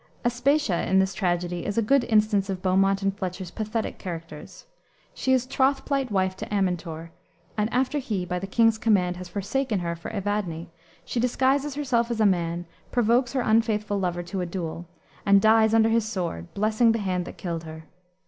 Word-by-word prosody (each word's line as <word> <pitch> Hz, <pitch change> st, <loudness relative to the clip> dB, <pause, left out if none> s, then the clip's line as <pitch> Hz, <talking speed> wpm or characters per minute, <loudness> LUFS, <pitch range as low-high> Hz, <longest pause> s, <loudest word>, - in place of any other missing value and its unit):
Aspatia, 245 Hz, -, +1 dB
in 190 Hz, -, +3 dB
this 190 Hz, 0 st, +2 dB
tragedy, 175 Hz, -2 st, -1 dB
is 205 Hz, -, -3 dB
a 230 Hz, -, +3 dB
good 270 Hz, +4 st, +3 dB
instance 210 Hz, -3 st, +2 dB
of 185 Hz, -1 st, -4 dB
Beaumont 195 Hz, +1 st, +2 dB
and 195 Hz, 0 st, 0 dB
Fletcher's 185 Hz, -2 st, -5 dB
pathetic 215 Hz, +2 st, -3 dB
characters. 165 Hz, -4 st, -8 dB, 0.5 s
She 260 Hz, -, -1 dB
is 255 Hz, -1 st, +3 dB
troth 270 Hz, +1 st, +1 dB
plight 275 Hz, -3 st, 0 dB
wife 190 Hz, -2 st, 0 dB
to -, -, -6 dB
Amintor, 170 Hz, -4 st, -2 dB, 0.4 s
and 215 Hz, +1 st, 0 dB
after 265 Hz, +4 st, +1 dB
he, 210 Hz, -9 st, -3 dB
by 180 Hz, 0 st, -2 dB
the 195 Hz, -, -5 dB
king's 225 Hz, +1 st, +3 dB
command, 185 Hz, -6 st, +2 dB
has 180 Hz, -1 st, -8 dB
forsaken 215 Hz, +5 st, -1 dB
her 170 Hz, -1 st, -2 dB
for 170 Hz, -, -8 dB
Evadne, 195 Hz, -5 st, -3 dB, 0.3 s
she 240 Hz, -, -2 dB
disguises 265 Hz, +4 st, +1 dB
herself 245 Hz, -5 st, 0 dB
as 235 Hz, -2 st, -2 dB
a 215 Hz, -, +4 dB
man, 175 Hz, -2 st, 0 dB, 0.3 s
provokes 240 Hz, +1 st, +2 dB
her 260 Hz, -, +1 dB
unfaithful 215 Hz, -3 st, +1 dB
lover 175 Hz, -2 st, -2 dB
to 185 Hz, +2 st, -4 dB
a -, -, -1 dB
duel, 170 Hz, -1 st, -5 dB, 0.4 s
and 200 Hz, 0 st, +5 dB
dies 220 Hz, +1 st, +5 dB
under 225 Hz, 0 st, +4 dB
his 225 Hz, -1 st, +2 dB
sword, 170 Hz, -, -4 dB
blessing 215 Hz, +3 st, +3 dB
the -, -, 0 dB
hand 185 Hz, -4 st, -2 dB
that -, -, -9 dB
killed 170 Hz, -2 st, -4 dB
her. 160 Hz, 0 st, -9 dB
200 Hz, 185 wpm, -25 LUFS, 180-230 Hz, 0.5 s, and